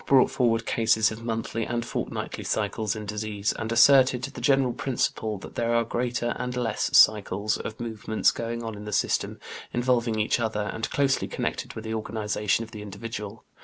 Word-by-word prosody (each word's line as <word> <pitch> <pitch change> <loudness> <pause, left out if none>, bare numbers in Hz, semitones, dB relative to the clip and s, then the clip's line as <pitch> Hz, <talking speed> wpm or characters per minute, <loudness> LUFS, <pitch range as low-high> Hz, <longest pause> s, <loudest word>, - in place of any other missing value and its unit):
i - - -19
and - - -29
ii) 135 - +7
brought 130 - +4
forward 115 -3 +1
cases 110 -1 +3
of 110 +1 -7
monthly 115 0 -2
and 120 +1 -2
fortnightly - - -4
cycles 105 -1 -1
in 110 -1 -6
disease, 105 0 -2
and 110 0 -3
asserted 125 +1 +6
"the 125 - -6
general 135 -1 +3
principle 110 -5 -1
that 95 - -10
there 115 0 0
are 115 - +3
greater 120 +1 -1
and 125 0 -3
less 115 -3 0
cycles 105 -1 +4
of 110 - -6
movements 110 -2 0
going 115 0 -4
on 115 -1 -4
in 105 0 -9
the 105 - -5
system, - - 0 0.3
involving 120 -2 +1
each 105 +3 +1
other, 110 -3 -1
and 110 - -3
closely 140 -2 +1
connected - - -3
with 110 - -6
the 110 0 -4
organization 105 -1 -1
of 115 - -11
the 105 -2 -8
individual." 105 +1 -7
115 Hz, 195 wpm, -26 LUFS, 105-120 Hz, 0.3 s, ii